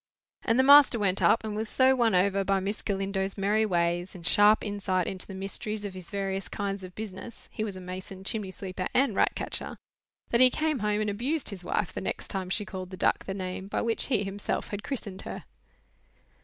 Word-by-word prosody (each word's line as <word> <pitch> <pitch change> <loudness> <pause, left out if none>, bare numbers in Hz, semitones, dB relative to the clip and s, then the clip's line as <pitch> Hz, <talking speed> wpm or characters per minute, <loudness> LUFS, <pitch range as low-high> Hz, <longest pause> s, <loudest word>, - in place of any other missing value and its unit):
And 230 - +1
the 260 - +5
master 285 -2 +8
went 195 -3 0
up, 225 - +4
and 215 -1 -4
was 215 0 -3
so 260 +3 +4
won 230 -5 +3
over 195 +2 +3
by 195 0 +1
Miss 200 +3 -3
Galindo's 195 0 -1
merry 210 +2 +2
ways, 175 0 0
and 170 -2 -10
sharp 210 +3 +5
insight 195 -3 -1
into 185 +1 -4
the 195 - -8
mysteries 205 +2 -4
of 200 - -5
his 185 -2 -10
various 195 -1 -3
kinds 200 -2 -3
of 180 -1 -10
business 215 +2 -8
(he 215 - -3
was 205 -3 -4
a 185 - -8
mason, 185 +1 -8
chimney 205 0 -1
sweeper, 185 -1 -4
and 260 -5 +3
ratcatcher), - - -1 0.5
that 235 - +4
he 255 - +9
came 305 +1 -1
home 210 0 0
and 215 - 0
abused 260 +8 -1
his 195 -4 -8
wife 180 +1 -1
the - - -4
next - - -4
time 190 -2 -3
she 210 +2 0
called 185 -3 -6
the 185 - -8
duck - - +1
the 190 - -4
name 185 0 -5
by - - -1
which 230 -1 +1
he 230 -7 +1
himself 195 +1 -3
had 205 0 -4
christened 205 -7 -5
her. - - -7
200 Hz, 215 wpm, -28 LUFS, 190-220 Hz, 0.5 s, he